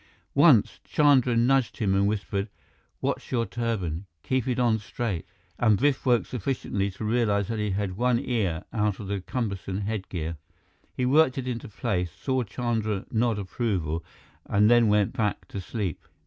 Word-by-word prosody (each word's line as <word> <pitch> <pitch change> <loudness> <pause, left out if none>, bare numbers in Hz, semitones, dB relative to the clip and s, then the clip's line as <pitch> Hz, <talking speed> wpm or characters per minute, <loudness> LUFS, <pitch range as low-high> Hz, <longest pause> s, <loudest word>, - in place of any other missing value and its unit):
Once, - - +5
Chandra 130 -5 +4
nudged 125 +1 +2
him 100 -3 +1
and 100 +1 +3
whispered, 100 0 -2 0.5
"Watch - - -2
your 120 -3 +1
turban! 100 -6 -3 0.2
Keep 130 0 0
it 125 - 0
on 120 -3 +2
straight!" 105 -4 -4 0.3
and 110 -4 +4
Biff 140 -1 +1
woke 120 -2 +4
sufficiently 105 -4 -2
to 100 +3 -6
realize 105 -3 +1
that 115 -1 -2
he 105 0 0
had 95 -1 -2
one 125 +1 +3
ear 100 -9 -1
out 105 -3 0
of 105 - -6
the 100 0 -3
cumbersome 100 -3 -3
headgear. 95 -6 -3 0.5
He 125 - -2
worked 140 0 +4
it 130 -1 -3
into 120 -2 -4
place, 100 -5 -1
saw 130 +5 -1
Chandra 110 -2 -2
nod 115 -1 +1
approval, 95 -6 -2 0.4
and 105 +2 +4
then 120 -1 +6
went 105 -1 +2
back 110 -5 -1
to 100 - -5
sleep. 95 -3 -3
110 Hz, 160 wpm, -26 LUFS, 100-120 Hz, 0.5 s, then